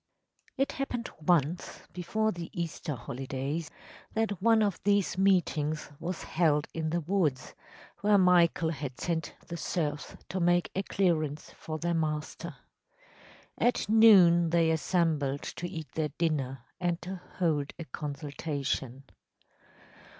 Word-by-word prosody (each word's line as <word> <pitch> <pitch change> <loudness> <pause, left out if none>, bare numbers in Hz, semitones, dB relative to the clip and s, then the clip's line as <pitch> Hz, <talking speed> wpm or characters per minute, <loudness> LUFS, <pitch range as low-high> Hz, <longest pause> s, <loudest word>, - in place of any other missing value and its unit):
‚ÄĚ - - -38
It 275 +1 +1
happened 250 -4 -3 0.2
once, 170 -1 +1
before 215 +5 0
the 175 -3 -6
Easter 165 -2 -3
holidays, 135 +6 -4 0.5
that 215 -4 0
one 225 0 +5
of 200 -4 -1
these 205 -1 +2
meetings 165 -6 +1
was 170 +2 -4
held 155 -3 +2
in 160 -1 -2
the 170 +2 0
woods, 160 -6 0 0.5
where 205 0 +4
Michael 175 -3 +4
had 140 -4 -6
sent 165 -2 -2
the 170 - -5
serfs 150 -4 -3
to 185 - -2
make 175 0 +2
a 195 - +1
clearance 160 -7 0
for 155 -1 -6
their 170 +2 -1
master. 155 -2 -2 1.0
At 240 -4 +2
noon 190 -6 +7
they 165 -1 +3
assembled 160 -4 +1
to 175 - -5
eat 160 -3 -7
their 155 -1 -1
dinner 135 -6 -1 0.2
and 175 -1 0
to 185 +1 -6 0.2
hold 155 -5 +1
a 165 - -6
consultation. 140 -2 -4
165 Hz, 130 wpm, -30 LUFS, 150-185 Hz, 1.0 s, noon